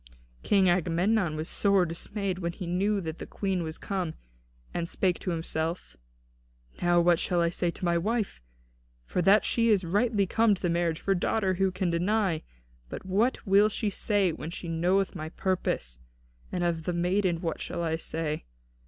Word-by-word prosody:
'" - - -32
King 195 -2 +5
Agamemnon 175 +1 +2
was 155 +1 -3
sore 200 -3 +3
dismayed 185 +3 -3
when 170 -1 -2
he 180 - -6
knew 195 +4 +1
that 160 -1 -5
the - - -7
Queen 190 -3 -2
was 160 -1 -5
come, 185 -5 -3 0.6
and 170 -1 -2
spake 185 -2 0
to - - -4
himself: 160 - -3 0.9
"Now 175 0 +4
what 170 -1 +4
shall 175 - 0
I 170 0 +2
say 175 0 0
to 180 +2 -5
my 170 0 +2
wife? 215 - -2 0.6
For 180 - -1
that 195 +4 +5
she 230 -1 +2
is 205 -4 +4
rightly 205 +4 +1
come 220 +2 +3
to - - -14
the 175 - +2
marriage 170 -1 0
of - - -24
her 195 - +3
daughter 190 +1 +1
who 190 +1 +2
can 185 -1 -1
deny? 180 -1 +1 0.5
But - - -7
what 210 +9 +1
will 200 +1 +5
she 215 0 -1
say 200 -2 +1
when 155 0 -6
she 170 +1 -7
knoweth 180 +4 +1
my 155 -3 -5
purpose? 160 - -2 0.5
And 180 - -1
of 165 -2 -1
the 180 - -1
maiden, 180 0 +1
what 165 -1 -3
shall 170 - -3
I 160 -1 0
say? 160 -2 -3
180 Hz, 190 wpm, -28 LUFS, 170-195 Hz, 0.9 s, King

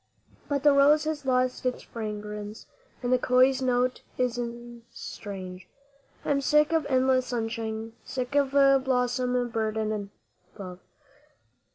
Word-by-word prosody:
But 285 -1 0
the 295 -1 +6
rose 285 +2 +5
has 305 -3 -3
lost 255 0 +1
its 255 -1 -2
fragrance, 210 -1 -6 0.4
and 245 +1 +1
the 255 - +4
köil's 255 +2 +4
note 250 0 +1 0.2
is 250 -1 0 0.5
strange; 185 -2 -8 0.6
I - - 0
am 280 -1 +2
sick 300 +3 +3
of 320 -3 +1
endless 260 -1 +3
sunshine, 225 -1 -3
sick 255 0 -4
of 285 -1 +3 0.3
blossom 250 -1 +1
burdened 215 -2 -2 0.5
bough. 185 -2 -8
250 Hz, 125 wpm, -27 LUFS, 220-265 Hz, 0.6 s, the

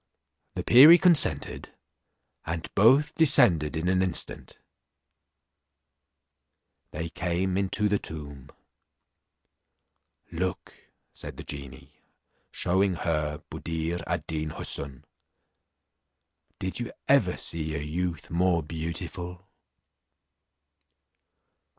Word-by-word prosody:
The - - -3
perie 150 +8 +9
consented, 175 -4 +2 0.7
and 80 0 -5
both 135 +9 +4
descended 110 - +4
in 80 +2 -2
an 95 0 +2
instant; 90 -3 -2 2.3
they 80 +2 -5
came 90 +2 -2
into 100 +2 0
the 105 -1 +1
tomb. 70 -4 -9 1.8
"Look," 90 +2 -4 0.4
said - - -9
the - - -8
genie, 70 -2 -10 0.5
shewing 95 +1 0
her 75 -3 -2
Buddir 80 +1 -4
ad - - -2
Deen 80 -1 -3
Houssun, 70 -2 -2 1.5
"did - - -4
you - - -5 0.2
ever - - +3
see 80 -2 -3
a - - -2
youth 85 +2 -4
more 85 -1 +1
beautiful?" 85 +3 -6
85 Hz, 90 wpm, -27 LUFS, 80-95 Hz, 2.3 s, perie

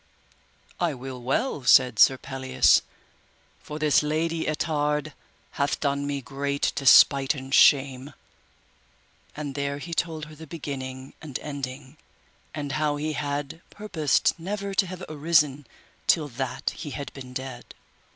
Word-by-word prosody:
I 170 -4 0
will 130 0 -8
well, 135 - -1
said 125 -3 +5
Sir 130 - +7
Pelleas, 130 -1 +2 0.8
for 150 - -8
this 155 -2 +3
Lady 160 +2 -1
Ettard 150 -1 -1 0.4
hath 140 0 -1
done 140 -1 -1
me 140 -1 -2
great 140 +3 -1
despite 140 +1 +6
and 135 0 -7
shame, 135 -1 +4 1.2
and 145 -1 -5
there 140 0 -2
he 165 +4 -7
told 160 -2 -2
her 155 - -13
the 160 +1 -11
beginning 135 -4 -6
and 150 -5 -5
ending, 140 0 -7 0.6
and 145 -2 -4
how 150 0 0
he 155 +1 -3
had 145 +2 -4
purposed 175 -9 +1
never 200 +3 -4
to 195 -1 +2
have 185 0 -8
arisen 150 -3 +1 0.4
till 155 -4 +3
that 125 0 -3
he 150 - -8
had 140 -2 -7
been 130 -2 -10
dead. 130 -1 -7
145 Hz, 135 wpm, -25 LUFS, 135-155 Hz, 1.2 s, Sir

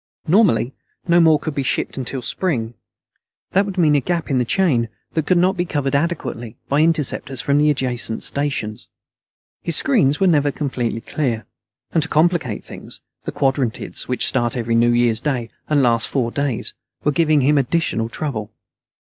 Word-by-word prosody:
Normally, 155 - +3 0.3
no 170 0 +5
more 160 -2 +5
could 155 - -5
be 140 - -1
shipped 135 - -1
in 135 - -3
until 130 0 -4
spring. 120 -6 -1 0.8
That 195 +2 +2
would 195 -1 -6
mean 160 -4 +4
a 145 - +3
gap 170 0 -2
in 130 - +2
the 125 - +1
chain 125 -8 +1 0.2
that 160 -2 -1
could 185 - +3
not 185 +2 +3
be 175 - 0
covered 145 -5 -2
adequately 140 -7 -2
by 140 +2 +2
interceptors 150 -5 0
from 140 +3 +2
the 150 +1 +4
adjacent 125 -5 +2
stations. 140 -7 -2 0.7
His 170 - -1
screens 140 0 +3
were 195 - +3
never 150 -5 +3
completely 125 -6 -3
clear. 120 -5 -2 0.5
And 165 - +2
to 160 - -2
complicate 155 - +1
things, - - -8 0.3
the - - -3
Quadrantids, 135 -4 -1
which 125 - 0
start 120 -2 +1
every 115 -1 -1
New 115 +1 +4
Year's 120 -1 +2
Day 125 -4 -2 0.2
and 145 -3 +3
last 115 -2 +2
four 120 -4 -1
days, 140 -5 -2 0.3
were 150 - +2
giving 155 -1 +3
him 145 +2 +3
additional 125 -5 0
trouble. 115 -6 -4
140 Hz, 175 wpm, -20 LUFS, 120-160 Hz, 0.8 s, no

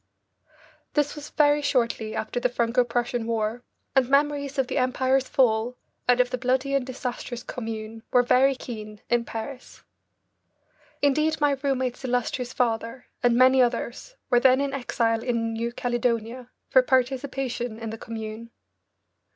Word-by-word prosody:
This 295 -1 +2
was 295 0 -8
very 295 0 +3
shortly 235 -5 0
after 220 - -2
the 250 - +1
Franco 240 +1 +2
Prussian 240 -1 -2
War, 225 +1 -1 0.3
and 260 -2 +3
memories 285 0 +1
of 270 - +2
the 260 - -1
Empire's 260 +1 +1
fall 235 -1 +2 0.3
and 245 0 +4
of 250 0 +3
the 255 - -2
bloody 260 +2 0
and 275 -2 +2
disastrous 250 -1 -5
Commune 225 -1 -6
were 245 - +5
very 265 +2 +4
keen 215 -4 -8
in 240 -1 +2
Paris. 250 +4 -7 1.2
Indeed 305 +3 +2
my 290 -1 +3
roommate's 260 -3 -1
illustrious 245 0 -1
father 230 0 -1 0.2
and 245 -1 +3
many 260 +1 +6
others 245 - -1 0.2
were 245 - +6
then 260 +1 +5
in 280 -1 -1
exile 230 -4 0
in 230 -2 -1
New 230 +1 -2
Caledonia 240 0 -2 0.2
for 260 - +6
participation 255 -2 -1
in 225 -1 -5
the 225 - -6
Commune. 220 0 -7
245 Hz, 145 wpm, -25 LUFS, 230-265 Hz, 1.2 s, many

